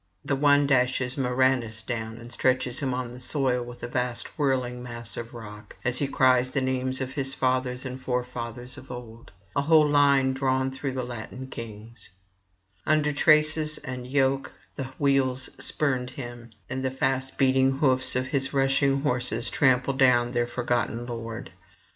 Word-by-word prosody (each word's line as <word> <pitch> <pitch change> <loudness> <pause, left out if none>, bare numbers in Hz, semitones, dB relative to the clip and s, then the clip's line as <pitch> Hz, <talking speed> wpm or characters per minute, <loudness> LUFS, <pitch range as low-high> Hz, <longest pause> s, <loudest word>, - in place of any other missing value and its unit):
The 140 - +1
one 145 +1 +4
dashes 130 -1 +2
Murranus 125 -4 +1
down 115 -2 -4
and 120 +1 -10
stretches 130 -1 +1
him 135 -3 -1
on 125 -1 -3
the 125 - -10
soil 130 -3 0
with 120 0 -11
a - - -2
vast 125 -1 -2
whirling 130 -4 0
mass 120 -1 -7
of 115 0 -6
rock, 105 -3 -10
as 125 0 0
he 140 - 0
cries 130 -2 +3
the 135 - 0
names 130 0 -1
of 130 0 -3
his 135 -1 -2
fathers 130 0 0
and 130 0 -6
forefathers 125 -1 -4
of 130 - -15
old, 120 -2 -9 0.3
a 140 - +3
whole 155 +1 +5
line 140 -2 +4
drawn 130 0 0
through 135 0 -4
Latin 125 +1 -6
kings; 115 0 -8 0.7
under 150 -1 +2
traces 155 +1 +3
and 130 -3 -6
yoke 135 0 +1 0.2
the 135 - -4
wheels 130 -2 +1
spurned 130 -4 0
him, 120 -2 -8 0.2
and 130 +1 -4
the 130 - +1
fast 130 0 -1
beating 135 0 +4
hoofs 130 -3 +2
of 130 0 +1
his 135 +1 -1
rushing 135 0 +2
horses 125 -4 +1
trample 130 -1 +3
down 125 -3 +4
their 120 -1 0
forgotten 120 -1 -1
lord. 115 -1 -6
130 Hz, 160 wpm, -26 LUFS, 120-135 Hz, 0.7 s, whole